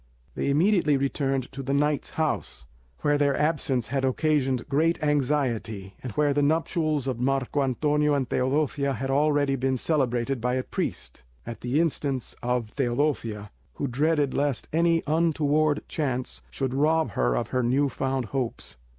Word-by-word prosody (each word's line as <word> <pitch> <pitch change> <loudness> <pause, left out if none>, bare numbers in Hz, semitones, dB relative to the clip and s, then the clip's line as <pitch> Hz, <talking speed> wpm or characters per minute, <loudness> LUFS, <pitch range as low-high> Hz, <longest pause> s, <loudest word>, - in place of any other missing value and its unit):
They - - -1
immediately 155 -1 +3
returned 135 -1 -1
to 135 - -6
the 135 +1 -1
knight's 150 0 +1
house, 155 - -2 0.4
where 145 0 +2
their 140 -1 +2
absence 145 -7 0
had 135 +1 -1
occasioned 135 -2 +1
great 160 +4 +1
anxiety, 125 -9 0
and 125 - -5
where 145 +2 +2
the 145 - +1
nuptials 155 -1 +1
of 130 -3 -2
Marco 135 +2 0
Antonio 150 +3 +1
and 135 -3 0
Teodosia 140 +2 0
had 135 0 -3
already 145 -1 +2
been 130 0 0
celebrated 130 -3 0
by 125 +1 0
a 130 - -1
priest, - - -4 0.2
at 115 -1 -7
the 125 +5 0
instance 140 -6 -1
of 120 -2 -2
Teodosia, 120 -5 -1 0.2
who - - -2
dreaded 145 +2 +1
lest 140 -3 -1
any 165 0 +3
untoward 155 -1 +2
chance 130 -5 -3
should 130 -2 -3
rob 155 -1 +2
her - - +1
of - - -2
her 130 - 0
new 130 +4 +2
found 135 0 -2
hopes. 120 - -3
140 Hz, 155 wpm, -26 LUFS, 125-150 Hz, 0.4 s, immediately